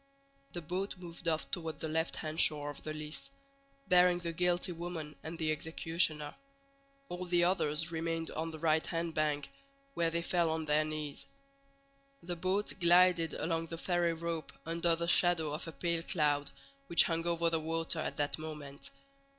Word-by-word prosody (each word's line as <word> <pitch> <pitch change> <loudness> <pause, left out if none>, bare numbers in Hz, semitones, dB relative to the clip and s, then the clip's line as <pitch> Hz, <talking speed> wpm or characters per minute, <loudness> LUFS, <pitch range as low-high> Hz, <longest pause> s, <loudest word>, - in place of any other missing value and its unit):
The 175 - -5
boat 185 +5 -3
moved 170 -1 -9
off 160 -1 0
toward 160 -5 -3
the - - -2
left 160 +1 0
hand 155 +1 -4
shore 145 -1 +3
of 145 - -12
the 155 - -5
Lys, 155 - -3 0.6
bearing 180 -1 +6
the 170 -1 -4
guilty 180 +1 +1
woman 165 -3 -5
and 160 +1 -6
the 160 -2 0
executioner; 160 -1 0 0.7
all 180 +1 -5
the 175 0 +3
others 165 -3 +2
remained 165 0 -2
on 160 +1 -2
the 160 - -7
right 155 0 +2
hand 165 -1 -2
bank, 150 - 0 0.4
where 170 -7 +2
they 170 +1 -1
fell 170 -2 +2
on 160 0 -1
their 150 0 +3
knees. 155 -2 -4 1.0
The 175 +1 -3
boat 185 +4 0
glided 175 -2 +5
along 165 0 -1
the 165 - -5
ferry 175 -1 +1
rope 165 -1 -4
under 170 +1 +2
the 170 +1 -3
shadow 170 -3 +3
of 155 - -5
a - - -4
pale 170 0 -1
cloud 145 -4 +1 0.4
which 170 - +7
hung 165 0 -1
over 170 -1 +1
the 165 - +1
water 165 +1 -1
at - - -3
that 145 +1 0
moment. 150 - -7
165 Hz, 175 wpm, -33 LUFS, 155-175 Hz, 1.0 s, which